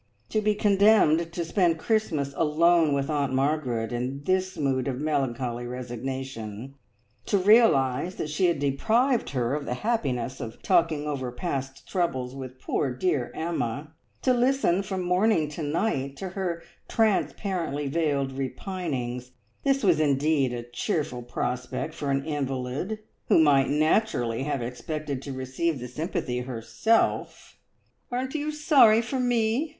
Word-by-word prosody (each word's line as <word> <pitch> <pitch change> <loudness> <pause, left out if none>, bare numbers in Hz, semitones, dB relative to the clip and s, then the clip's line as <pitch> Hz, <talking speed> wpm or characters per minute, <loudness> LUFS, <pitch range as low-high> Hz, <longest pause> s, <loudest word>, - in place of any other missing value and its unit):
To 215 - +1
be 210 0 +2
condemned 200 -6 +4
to 170 -1 -2
spend 170 -1 +2
Christmas 160 -9 0
alone 165 -1 +3
with 140 0 -1
Aunt 145 -3 0
Margaret 130 -5 0
in 130 +4 -3
this 185 +2 0
mood 135 -3 0
of 130 -2 -2
melancholy 125 -5 -1
resignation; 125 -1 -5 0.5
to 200 - +3
realise 185 - +4
that 150 - -4
she 180 +4 +2
had 170 - +1
deprived 220 - +1
her 125 -2 -1
of 145 -1 -2
the 125 - -2
happiness 130 - -1
of 115 -4 -7
talking 165 -5 +2
over 135 -4 -3
past 135 -1 -4
troubles 130 -9 -1
with 130 -1 -8
poor 140 - -1
dear 130 0 -1
Emma; 155 -2 -3 0.3
to 255 - +4
listen 245 -7 +2
from 190 -2 -3
morning 180 -2 +2
to 150 +2 -7
night 145 -3 -1
to 190 - -5
her 180 -3 -3 0.2
transparently 190 - 0
veiled 140 -3 0
repinings 130 -3 -4 0.3
this 275 -1 +2
was 175 -6 +4
indeed 145 -2 +2
a 120 -1 -4
cheerful 125 - -2
prospect 125 +5 -3
for 145 - -4
an 135 0 0
invalid, 140 +5 -3 0.3
who - - +5
might 145 -4 +5
naturally 150 - +1
have 135 -3 -2
expected 140 +3 -4
to 140 - -6
receive 130 +5 -2
the 125 0 -6
sympathy 125 -2 -3
herself. 125 - -1 0.5
"Aren't 255 +2 -2
you 305 0 -2
sorry 280 -8 +5
for 260 +3 -3
me?" 245 +4 +1
150 Hz, 140 wpm, -26 LUFS, 130-185 Hz, 0.5 s, who